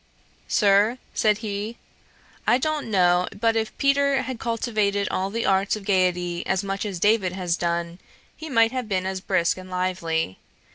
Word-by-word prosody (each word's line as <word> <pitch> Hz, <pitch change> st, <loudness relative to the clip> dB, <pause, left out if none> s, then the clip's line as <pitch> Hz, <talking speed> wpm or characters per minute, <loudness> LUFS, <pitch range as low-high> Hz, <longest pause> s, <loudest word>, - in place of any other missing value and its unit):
'Sir, 205 Hz, +3 st, +3 dB, 0.2 s
(said 210 Hz, -1 st, +2 dB
he,) 210 Hz, +2 st, -4 dB, 0.7 s
I 240 Hz, -, +5 dB
don't 305 Hz, -1 st, -2 dB
know 180 Hz, -3 st, +3 dB
but 225 Hz, 0 st, +2 dB
if 220 Hz, -1 st, -2 dB
Peter 275 Hz, 0 st, +2 dB
had 255 Hz, -3 st, -5 dB
cultivated 215 Hz, -4 st, 0 dB
all 190 Hz, +1 st, -1 dB
the 230 Hz, +3 st, -2 dB
arts 195 Hz, +1 st, +2 dB
of 210 Hz, -2 st, -9 dB
gaiety 180 Hz, -3 st, +1 dB
as 190 Hz, +1 st, 0 dB
much 195 Hz, +1 st, -3 dB
as 190 Hz, -4 st, -5 dB
David 205 Hz, -2 st, +2 dB
has 180 Hz, -2 st, -1 dB
done, 170 Hz, 0 st, -2 dB, 0.4 s
he 315 Hz, 0 st, -8 dB
might 230 Hz, -3 st, +4 dB
have 255 Hz, -4 st, -4 dB
been 185 Hz, -2 st, 0 dB
as 190 Hz, 0 st, -3 dB
brisk 185 Hz, -3 st, +1 dB
and 185 Hz, 0 st, -10 dB
lively. 180 Hz, -, -2 dB
200 Hz, 170 wpm, -24 LUFS, 185-225 Hz, 0.7 s, I